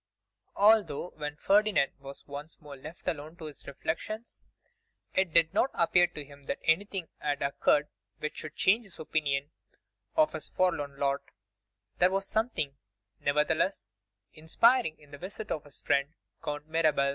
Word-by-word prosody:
ALTHOUGH, 200 -6 +4
when 150 -1 -4
Ferdinand 200 -3 +3
was 140 0 -10
once 145 +2 -8
more 145 -2 -10
left 155 +6 -11
alone 155 +1 -3
to 165 - -9
his 150 -2 -9
reflections, 170 - -4 0.7
it 190 -3 +2
did 165 0 +4
not 265 - +3
appear 175 +1 +5
to 150 -4 -8
him 140 0 -15
that - - -2
anything 190 +1 +1
had 145 -1 -1
occurred 145 +1 +3 0.3
which 150 - -4
should 155 -1 -7
change 215 +6 +4
his 195 -5 -15
opinion 145 -2 -1 0.6
of 310 -1 +4
his - - -5
forlorn 155 -7 0
lot, 140 0 +1 0.8
there 180 - +6
was 195 +1 -1
something, 220 - 0 0.4
nevertheless, 150 +6 +1 0.5
inspiring 160 +4 +3
in 145 -1 -20
the 145 - -9
visit 205 +4 -7
of 150 - -2
his 145 - -15
friend 140 +3 +1 0.3
Count 150 0 -4
Mirabel. 155 -4 +3
155 Hz, 150 wpm, -30 LUFS, 145-185 Hz, 0.8 s, there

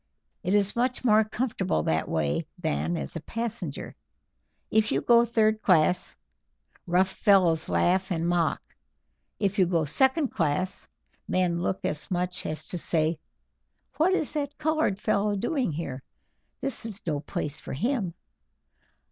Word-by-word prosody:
"It 185 +3 +1
is 205 -1 +4
much 250 +1 0
more 215 -2 +5
comfortable 215 - -1
that 80 +1 0
way 80 - -1
than 170 0 -1
as - - -4
a 165 - -4
passenger. 230 +4 -4 0.8
If 220 0 +3
you - - +2
go 235 0 +5
third 220 -2 +2
class, 180 -1 +3 0.7
rough 185 +2 +2
fellows 185 -7 +3
laugh 190 +2 +2
and 170 -2 -1
mock; 175 -2 +1 0.8
if 200 0 0
you 185 - +5
go 170 -3 +1
second 265 - +3
class, 185 +6 -1 0.4
men 175 -2 +1
look 185 - -1
as 150 - -2
much 180 0 -2
as 155 - -4
to 180 - -3
say, 160 -1 0 0.8
'What 350 +5 +3
is 305 - -2
that 290 -1 -3
colored 310 -10 +1
fellow 205 0 +1
doing 245 - -1
here? 145 -4 -5 0.6
This 270 -2 -1
is 220 -2 -4
no 150 -4 -1
place 150 0 -4
for - - -7
him.' 195 - -1
190 Hz, 145 wpm, -27 LUFS, 165-230 Hz, 0.8 s, more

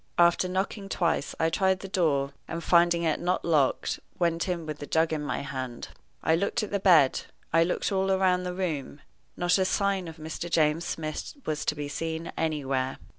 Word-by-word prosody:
After 175 +1 +4
knocking 195 +2 -2
twice 170 -6 0
I 160 0 +2
tried 190 +1 +2
the 195 - -6
door, 145 -7 +1
and, 170 0 -5
finding 170 0 +4
it 160 -2 +1
not 180 +1 -1
locked, 150 -6 +1 0.2
went 170 +1 0
in 170 -2 -2
with 155 -1 -5
the 145 - -7
jug 160 0 +2
in 155 - -1
my 145 -3 -2
hand. 130 -3 -5 0.3
I 160 - +4
looked 200 +6 0
at 215 - -5
the 200 - 0
bed 165 -9 +5 0.3
I 165 - +6
looked 180 +4 -1
all 190 0 +1
round 180 -1 +2
the 180 0 -4
room. 155 -6 -3 0.4
Not 175 +2 +2
a - - +4
sign 195 -1 0
of 160 0 -9
Mr. 160 +2 -5
James 160 0 +2
Smith 155 -3 -4
was 150 -1 -2
to 150 - 0
be 145 -1 -4
seen 160 +3 -4
anywhere. 135 -5 -1
165 Hz, 195 wpm, -27 LUFS, 150-180 Hz, 0.4 s, I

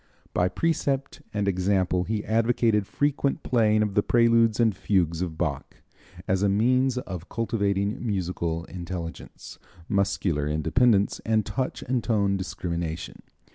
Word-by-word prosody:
By 90 +1 +2
precept 140 - -1
and 105 -1 -1
example 95 -1 +1
he 105 +1 -2
advocated 115 -2 +2
frequent 145 -1 0
playing 110 -3 +3
of 105 -2 -2
the 105 - +3
preludes 115 -1 +3
and 110 -4 +3
fugues 85 -3 0
of 85 -3 -3
Bach 75 -6 -3 0.5
as 95 0 +1
a 100 - +3
means 125 +5 +2
of 90 -7 -6
cultivating 100 -2 -1
musical 90 -6 -2
intelligence, 85 -2 -7 0.3
muscular 95 -7 0
independence 100 - +2
and 110 -2 +1
touch 110 +6 -3
and 125 -2 -1
tone 100 -4 +1
discrimination. 85 -3 -4
100 Hz, 130 wpm, -26 LUFS, 90-115 Hz, 0.5 s, playing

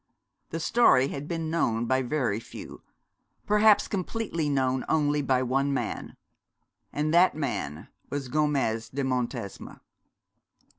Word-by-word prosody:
The 165 - -4
story 150 - +4
had 140 +1 -6
been 165 -2 -3
known 120 -8 +1
by 130 +2 +2
very 125 -5 -1
few 115 - -10 0.6
perhaps 210 0 +5
completely 185 -5 -2
known 130 -2 +1
only 150 -1 +2
by 130 -2 +1
one 135 +3 +1
man; - - -4 0.8
and 150 +2 -1
that 175 0 +5
man 105 - -4 0.2
was 140 -2 -3
Gomez 135 -6 0
de 140 +1 -3
Montesma. 125 -5 -3
140 Hz, 120 wpm, -27 LUFS, 125-155 Hz, 0.8 s, perhaps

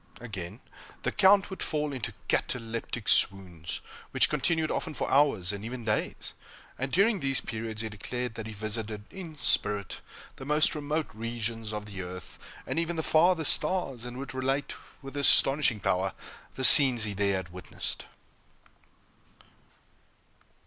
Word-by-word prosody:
Again, 100 -8 -8 0.4
the - - 0
Count 195 +1 +4
would 190 - -7
fall 150 -2 -1
into 130 -5 -5
cataleptic 115 -1 -3
swoons, 90 -4 +2 0.3
which - - +4
continued 160 -2 0
often 155 - -3
for - - -2
hours, 135 -10 +3
and 100 0 -7
even 120 +1 -6
days; 105 -1 -1 0.5
and, 135 +1 -3
during 200 +3 +3
these 135 -3 +1
periods, 110 -1 -5
he 110 - -4
declared 125 +4 -4
that 110 -1 -7
he - - -7
visited, 110 0 -4
in 170 -5 -9
spirit, 105 -7 -1 0.4
the - - -9
most 150 +2 +2
remote 150 +1 -2
regions 115 0 -4
of 105 -1 -5
the 100 -2 -7
earth, 90 -1 -9 0.3
and - - -2
even 170 +1 -2
the 160 - -2
farthest 160 0 +4
stars, 135 -11 -2
and 125 0 -8
would 135 0 -7
relate, 135 +2 -1 0.3
with 135 +1 -9
astonishing 140 -4 +4
power, 95 0 0 0.4
the 130 - -5
scenes 130 -6 +9
he 105 -1 -1
there 100 0 0
had 95 -2 -4
witnessed! 90 -1 -5
120 Hz, 150 wpm, -28 LUFS, 105-150 Hz, 0.5 s, scenes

